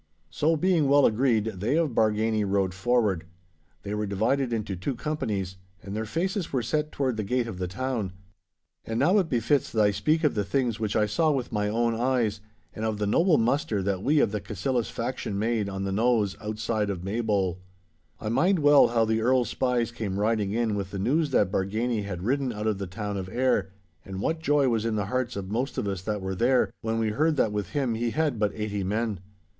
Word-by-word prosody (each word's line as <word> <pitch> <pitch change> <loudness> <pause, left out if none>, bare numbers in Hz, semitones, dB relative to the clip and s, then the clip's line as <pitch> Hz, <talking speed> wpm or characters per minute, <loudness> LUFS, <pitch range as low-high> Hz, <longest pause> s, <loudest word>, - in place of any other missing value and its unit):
So 160 +2 +2
being 170 -2 +2
well 140 0 +5
agreed, 115 -1 +3
they 110 +10 0
of 165 -2 +2
Bargany 110 0 +2
rode 95 -2 0
forward. 105 -3 +1 0.6
They 100 - -4
were 105 0 -2
divided 115 +6 0
into 105 -4 -2
two 110 +9 -3
companies, 105 -10 -3 0.3
and 100 +1 -6
their 110 0 -3
faces 180 - -2
were 130 -3 0
set 150 +6 -1
toward 130 -5 -1
the 110 - -1
gate 125 +4 0
of 110 -6 -7
the 90 - -2
town. 115 0 -3 0.7
And 115 - -3
now 180 +9 +4
it 180 -4 -1
befits 120 +3 +1
that 110 -2 +2
I 105 - +4
speak 155 +11 +1
of 150 - +3
the 105 - 0
things 120 +1 -1
which 110 -2 -2
I 110 -1 +3
saw 155 +10 +1
with 135 -5 -1
my 105 -1 0
own 115 +2 +1
eyes, 115 -3 0 0.3
and 110 - -6
of 110 -1 -1
the 105 - -1
noble 165 - +3
muster 115 -4 +1
that 95 -1 -1
we 150 +7 +3
of - - +2
the 105 -1 -3
Cassillis 115 +5 -2
faction 115 -4 -3
made 110 -1 0
on 95 0 -4
the 100 - -2
knowes 110 -1 +2
outside 110 0 -2
of 90 -3 -4
Maybole. 100 -3 -1 0.6
I 110 - -6
mind 175 - +3
well 145 -2 +6
how 115 -1 +2
the 110 0 0
Earl's 125 -1 +2
spies 120 -2 0
came 100 -4 -3
riding 105 -2 +1
in 115 0 0
with 100 -2 -3
the 100 - -6
news 145 +10 +1
that 100 -8 +2
Bargany 110 +3 -1
had 90 -3 -5
ridden 135 +3 0
out 105 -1 -5
of 105 -3 0
the 100 - -4
town 105 +2 -4
of 95 -1 -5
Ayr, 120 -5 +1 0.3
and 95 -1 -7
what 160 +10 -1
joy 145 -3 +2
was 115 -3 +1
in 115 -1 -1
the 105 -2 -1
hearts 125 -1 -1
of 100 -1 -5
most 125 +4 -2
of - - -1
us 95 -3 -3
that 105 +1 -3
were 95 0 -3
there, 125 +6 +2
when 115 0 -1
we 110 -1 +1
heard 155 +8 +1
that 115 -6 +2
with 105 -1 -3
him 135 -5 0
he 115 +1 -1
had 150 -3 0
but 105 -1 +2
eighty 105 -2 -3
men. 105 +1 -1
110 Hz, 220 wpm, -27 LUFS, 100-130 Hz, 0.7 s, well